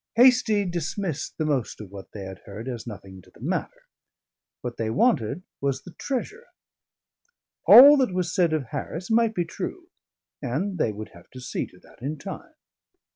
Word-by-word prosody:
Hastie 235 -4 +5
dismissed 175 -1 -3
the 155 - 0
most 140 -6 -1
of 105 -3 -9
what 100 -1 -10
they 100 - -7
had 95 0 -8
heard 110 +4 -8
as 120 -2 -5
nothing 95 -4 -9
to - - -21
the - - -21
matter: - - -3 0.8
what 120 -1 -5
they 110 -1 -1
wanted 145 - +1 0.2
was 140 -1 -1
the 180 - -11
treasure. 420 - -4 1.2
All 285 +4 +11
that 260 -6 +2
was 180 -2 -1
said 175 -4 +3
of 155 -3 0
Harris 180 +6 -5
might 225 -1 +3
be 175 - 0
true, 345 - -6 0.5
and 160 +9 -2
they 110 - +2
would 105 +1 -7
have 85 0 -17
to 130 - -9
see 125 - -3
to - - -19
that - - -20
in 145 +4 -3
time. 195 - -9
160 Hz, 180 wpm, -25 LUFS, -, 1.2 s, All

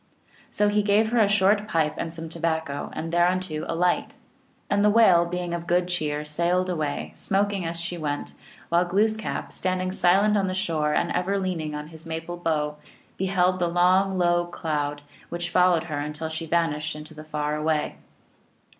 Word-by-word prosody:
So 210 - +1
he 210 0 +2
gave 210 +2 +3
her 240 0 +2
a 215 - +5
short 205 +1 +3
pipe 160 -6 +1
and 165 - -4
some 165 0 -6
tobacco, 160 -3 -2
and 165 +1 -5
thereunto 175 -2 +1
a 165 - -2
light. 180 +1 0 0.5
And 205 0 +2
the 210 - +5
Whale, 190 -6 +5
being 175 0 -3
of 170 0 -4
good 175 +1 +2
cheer, 150 -4 -1
sailed 175 +4 0
away, 150 -4 -3
smoking 200 -1 0
as 165 0 -3
she 170 +1 -4
went, 145 -2 -3 0.4
while 170 +1 +3
Gloos 205 +5 +2
kap, 220 - -4
standing 185 0 -1
silent 195 +3 +3
on 195 -1 +1
the 185 - -2
shore, 160 -6 0
and - - +1
ever 190 +3 0
leaning 170 -6 -2
on 150 +1 -6
his 165 0 -10
maple 165 +2 -5
bow, 150 -3 -1 0.4
beheld 185 -1 +1
the 175 - +1
long 185 +2 +3
low 175 -1 +2
cloud 150 -4 -3 0.3
which 175 0 -4
fol 180 0 +5
lowed 165 -1 +1
her 155 -3 -4
until 150 +2 -4
she 160 +1 -5
vanished 160 -3 0
in 150 - -7
the 155 0 -10
far 150 -1 -2
away. 150 0 -1
175 Hz, 185 wpm, -25 LUFS, 155-185 Hz, 0.5 s, a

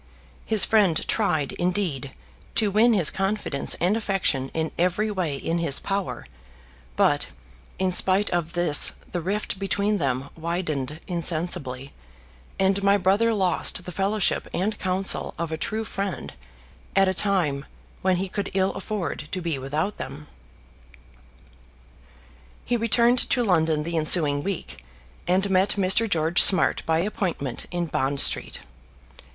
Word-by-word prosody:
His 220 -3 +5
friend 200 -8 +2
tried, 170 -10 0
indeed, 175 -7 -2 0.4
to 215 -3 +3
win 225 +4 +4
his 180 -8 +5
confidence 195 -7 -1
and 180 +5 0
affection 195 -11 -1
in 160 -1 -3
every 185 +5 0
way 180 -8 -2
in 165 +4 -2
his 150 -5 +1
power; 195 -1 -4 0.7
but - - +2 0.5
in 185 0 0
spite 190 +3 +3
of 170 -1 -2
this 175 -4 +4 0.2
the 175 - -3
rift 200 +2 -3
between 200 +1 0
them 135 -1 -2
widened 160 -4 -4
insensibly, 155 -6 -3 0.6
and 195 +1 +1
my 200 0 +3
brother 200 +5 +2
lost 185 -3 0
the 180 - -6
fellowship 195 +3 0
and 205 +4 -2
counsel 190 0 0
of 170 -1 -4
a - - -1
true 220 +7 -3
friend 200 -3 -5 0.6
at 195 0 +4
a 190 - +1
time 175 -8 0 0.4
when 185 0 +2
he 190 +2 -2
could 200 +2 -4
ill 190 0 +1
afford 185 -7 -5
to 185 - -3
be 165 -5 -3
without 150 +9 -3
them. 140 +3 -8 2.4
He 245 - 0
returned 235 +2 +3
to 245 - +1
London 160 -6 +1
the 170 +1 -3
ensuing 155 -2 +4
week, 190 - -6 0.4
and 185 +3 +1
met 190 +2 +2
Mr. 200 +4 +4
George 165 -1 +3
Smart 190 - +4
by 160 0 +2
appointment 175 - -3
in 175 -1 -2
Bond 140 -3 -1
Street. - - +4
180 Hz, 140 wpm, -24 LUFS, 160-200 Hz, 2.4 s, His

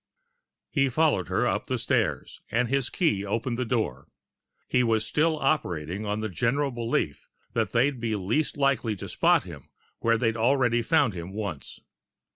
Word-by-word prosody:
He 135 -3 +2
followed 155 +4 +2
her - - +1
up - - -1
the - - -1
stairs, - - -1
and 120 +2 +1
his 140 -1 0
key 110 - +1
opened 115 +4 -2
the 125 - 0
door. 110 - -2 0.6
He 125 - +2
was 110 -2 +1
still 155 +4 +1
operating 95 - -1
on 105 +1 -1
the 110 - -1
general 130 - 0
belief 115 - -2 0.3
that 110 -3 0
they'd 125 +2 +2
be 115 -2 -1
least 110 +13 -1
likely 135 -6 +1
to - - -7
spot - - +3
him - - -11 0.3
where 115 0 +2
they 115 - -1
had 115 0 +1
already 120 0 +3
found 140 - +2
him 90 +1 -7
once. 100 -9 -6
115 Hz, 170 wpm, -27 LUFS, 105-135 Hz, 0.6 s, spot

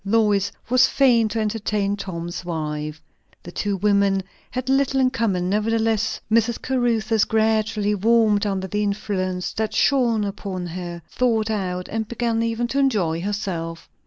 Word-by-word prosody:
Lois 205 -1 +2 0.2
was 255 +1 +5
fain 240 -5 +4
to 220 +1 -3
entertain 210 -2 -1
Tom's 175 -3 -5
wife. 155 -2 -4 0.4
The 175 - -9
two 200 +2 -2
women 200 -1 +2 0.3
had 255 0 -4
little 270 0 +2
in 255 -1 +3
common; 200 -8 0
nevertheless 220 +2 +1
Mrs. 230 +1 +2
Caruthers 230 -4 +1
gradually 220 -1 +1
warmed 215 0 +3
under 190 -1 -2
the 210 +2 -2
influence 195 -3 -2
that 220 0 -2
shone 240 -6 +3
upon 195 -2 -4
her; 175 -1 -6
thawed 225 -3 0
out, 180 -3 -2
and 220 0 -3
began 230 -1 -1
even 230 +1 -1
to 275 - 0
enjoy 195 -12 +1
herself. 180 -5 -4
210 Hz, 145 wpm, -22 LUFS, 190-230 Hz, 0.4 s, was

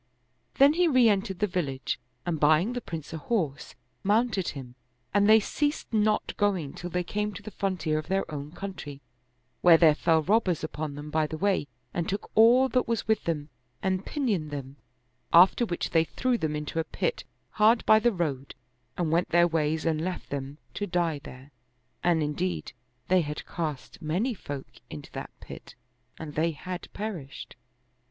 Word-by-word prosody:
Then 280 +2 +6
he 350 +2 +3
re 255 -6 +5
entered 195 -2 0
the 210 - +2
village 140 - -2 0.3
and 165 -3 -1
buying 155 +10 +4
the 245 - -3
Prince 165 -6 -7
a 160 - -4
horse, 160 - -2 0.3
mounted 210 -2 +1
him, 130 -4 -6 0.4
and 205 0 +4
they 220 +1 +8
ceased 290 +5 -2
not 215 0 +1
going 190 -9 0
till 175 - -6
they 180 +1 -1
came 210 +3 -2
to 200 - -9
the 215 - -8
frontier 175 -7 -1
of 155 - -8
their 195 +1 0
own 145 0 -5
country, 175 -7 -7 0.6
where 170 -2 +8
there 160 -2 +6
fell 160 +1 +2
robbers 185 -3 +2
upon 155 -2 -4
them 145 +1 -8
by 155 0 +1
the 155 - -5
way 195 -5 +1 0.3
and 170 - -2
took 200 - -4
all 240 +4 +6
that 255 -1 +1
was 230 -2 -1
with 220 0 +1
them 155 -3 -2 0.3
and 190 0 0
pinioned 210 - -1
them; 140 -1 -7 0.5
after 185 +7 +6
which 175 - -3
they 165 -1 +4
threw 255 +8 0
them 155 -9 -1
into 150 +2 -3
a - - +1
pit 480 - -2 0.3
hard 220 +2 +4
by 215 - +7
the 240 +2 +3
road 145 - -3 0.4
and 170 -3 0
went 170 +2 +2
their 175 +1 +5
ways 160 -1 0
and 160 -1 +1
left 180 0 -4
them 140 0 -4 0.2
to 205 - -3
die 170 -4 0
there; 130 +3 -12 0.5
and 170 -3 +3
indeed 95 - -2 0.3
they 185 0 +4
had 150 -1 -5
cast 155 -1 -5
many 180 +11 0
folk 145 -9 -6 0.2
into 75 -2 -9
that - - -6
pit - - -11 0.4
and 155 -2 -7
they 160 +3 +1
had 180 +4 -7
perished. 190 -10 -6
175 Hz, 180 wpm, -27 LUFS, 150-210 Hz, 0.6 s, they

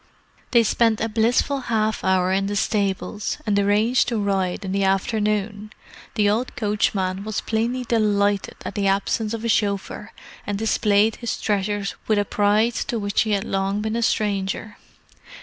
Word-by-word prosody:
They 235 -2 +5
spent 225 0 +2
a 225 - 0
blissful 235 +5 +1
half 220 -1 0
hour 185 -1 +2
in 195 +1 +1
the 205 - -2
stables, 200 -1 -1
and 205 -1 +2
arranged 210 +5 +2
to 235 - -1
ride 195 -2 -1
in 190 - -3
the 195 0 0
afternoon—the 210 +1 -2
old 225 +5 0
coachman 200 -3 0
was 215 -1 -3
plainly 235 +3 -1
delighted 205 -4 +1
at - - -4
the 200 -2 0
absence 210 +3 0
of 225 +1 -6
a - - +1
chauffeur, 205 -2 -1 0.4
and 205 -1 -1
displayed 215 0 +2
his 235 - -4
treasures 205 -1 -1
with 215 - +2
a 205 - +1
pride 210 +4 +2 0.2
to 240 - -1
which 200 -2 0
he 220 - 0
had 200 -1 0
long 195 +1 -1
been 220 +1 -2
a 235 - 0
stranger. 205 -1 -1
210 Hz, 165 wpm, -22 LUFS, 200-220 Hz, 0.4 s, They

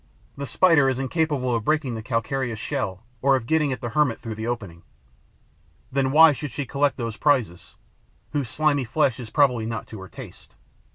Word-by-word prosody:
The 140 0 -5
Spider 155 0 +4
is 130 - -1
incapable 135 -2 0
of 115 -2 -1
breaking 150 -2 0
the 110 - -5
calcareous 115 +1 -2
shell 110 -5 -3 0.2
or 135 0 +4
of 125 -4 -2
getting 150 +1 +1
at 130 - -4
the 120 - -3
hermit 130 -1 +1
through 115 - -6
the 110 +1 -5
opening. 100 -9 -5 1.1
Then 135 0 +1
why 160 +2 +8
should 145 +1 -5
she 135 +3 -4
collect 140 +2 0
those 115 -3 -4
prizes, 120 - 0 0.6
whose 140 -5 -2
slimy 150 0 +1
flesh 130 +1 0
is 120 -3 -7
probably 125 -3 +2
not 115 -3 -4
to 110 - -8
her 95 - -10
taste? - - -12
130 Hz, 185 wpm, -24 LUFS, 115-145 Hz, 1.1 s, why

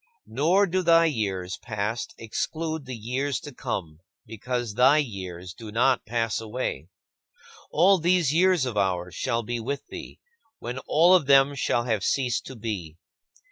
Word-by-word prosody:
Nor 165 - +2
do 185 0 0
thy 165 -1 +5
years 95 - -2
past 110 0 -4
exclude 155 +7 -3
the 130 - -5
years 125 +5 -2
to 145 -4 -9
come 80 -9 -5 0.3
because 120 +1 -4
thy 130 +6 +5
years 95 - -4
do 110 +1 -10
not 125 +3 +2
pass 115 -1 -1
away. 110 -6 -4 0.8
All 185 +4 +4
these 170 -3 +2
years 180 -3 +3
of 125 -4 -4
ours 90 -3 0
shall 120 -3 -1
be 120 +2 -3
with 135 +5 -4
thee, - - -9 0.4
when 125 +2 -5
all 170 +4 +5
of 170 -7 +4
them 140 0 +5
shall 120 -3 0
have 110 -5 -1
ceased 125 -1 0
to 130 - -8
be. 100 -9 -5
125 Hz, 155 wpm, -26 LUFS, 105-150 Hz, 0.8 s, thy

